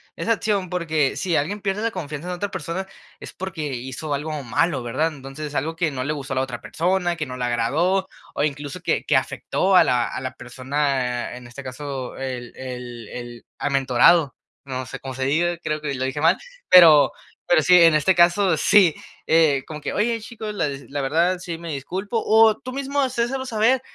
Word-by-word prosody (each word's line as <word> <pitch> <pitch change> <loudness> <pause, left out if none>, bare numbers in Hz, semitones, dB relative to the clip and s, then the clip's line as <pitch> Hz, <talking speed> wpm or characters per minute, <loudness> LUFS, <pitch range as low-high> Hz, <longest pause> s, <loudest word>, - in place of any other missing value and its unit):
esa 230 - -2
acción, 205 -4 0
porque 160 -6 0
si 170 +3 -1
alguien 195 +9 -1
pierde 200 +1 -2
la 230 - 0
confianza 155 -4 -6
en - - -2
otra 200 +3 -3
persona 190 +1 -4 0.3
es - - -9
porque 170 -7 -5
hizo 130 +5 -5
algo 150 +1 -4
malo, 140 +4 0
¿verdad? 125 +7 0
Entonces 135 +2 -7
es 145 - -10
algo 160 +4 -1
que 165 -2 0
no 130 -2 -3
le 150 +3 -1
gustó 140 -2 -5
a - - -3
la - - +3
otra 130 -2 -5
persona, 175 +1 0
que 155 -3 -4
no 125 0 -7
le 125 - -2
agradó 155 +12 +1 0.3
o - - -1
incluso 145 +3 -3
que - - 0
que - - +2
afectó 190 0 +1
a - - +8
la 120 -1 +1
a - - -5
la 130 0 -5
persona, 130 -1 -2
en 125 - -12
este 120 +3 -9
caso, 130 0 -6
el 125 -2 -5
el 125 -3 -7
el 120 -1 -9
amentorado. 140 +2 +3 0.3
No 130 -1 -4
sé - - -7
cómo 135 -1 -7
se 130 +1 -3
diga, 170 +5 +1
creo 155 -2 -2
que 145 -2 -3
lo 130 -1 -2
dije 130 +2 -3
mal, 165 +4 +4 0.3
pero 160 -5 +8 0.3
pero 170 -3 +4
sí, 180 +5 +5
en 165 -1 +6
este 155 +5 +3
caso 175 +1 +4
sí, 175 +1 +5 0.3
eh, 155 -4 +4
como 155 -1 -7
que: - - -3
"Oye, 230 +2 0
chico, 220 -2 -7
la 165 -7 -1
desi 140 0 -8
la 145 0 -3
verdad 170 +7 +1
sí 175 -2 -5
me 165 -1 -6
disculpo" 190 - -3
o 220 0 +5
tú 255 - -8
mismo 275 +2 -1
hacérselo 260 0 -1
saber: 240 +1 +2
155 Hz, 210 wpm, -22 LUFS, 135-185 Hz, 0.3 s, a